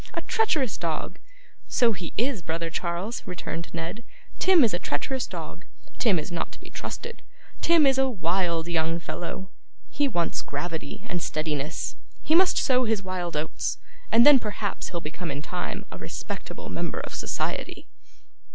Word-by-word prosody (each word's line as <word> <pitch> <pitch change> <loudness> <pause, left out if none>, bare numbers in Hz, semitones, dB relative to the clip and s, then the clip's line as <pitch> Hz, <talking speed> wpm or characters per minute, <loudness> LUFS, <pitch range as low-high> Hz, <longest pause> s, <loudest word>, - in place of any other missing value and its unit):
A - - 0
treacherous 310 - +2
dog!' 165 -3 -2 0.5
'So 240 -3 +4
he 180 -5 -4
is, 240 -3 +1
brother 165 0 -2
Charles,' 175 +7 -2
returned 170 -2 -4
Ned; 170 +7 -4 0.4
'Tim 370 -5 +7
is 225 - +4
a 175 - +1
treacherous 255 - -1
dog. - - -7 0.4
Tim 215 -7 +4
is 155 - -3
not 170 - -2
to - - -11
be - - -12
trusted. 470 0 -6 0.4
Tim 330 -3 +6
is 270 -1 +5
a 265 0 +4
wild 175 -5 +1
young 165 -1 +1
fellow. 180 +3 -5 0.4
He 290 - +2
wants 175 -9 0
gravity 165 +7 -4
and 175 -5 -2
steadiness; 155 0 -2 0.3
he 310 - +2
must 365 +2 +6
sow 255 -2 +4
his 220 -3 +1
wild 180 -3 -2
oats, 155 +1 -1 0.3
and 235 +1 +8
then 290 -2 +10
perhaps 210 -2 -3
he'll 170 - -3
become 165 +3 -5
in 145 - -3
time - - -3
a - - -7
respectable - - -6
member - - -2
of - - -7
society. - - -2
180 Hz, 160 wpm, -27 LUFS, 165-245 Hz, 0.5 s, then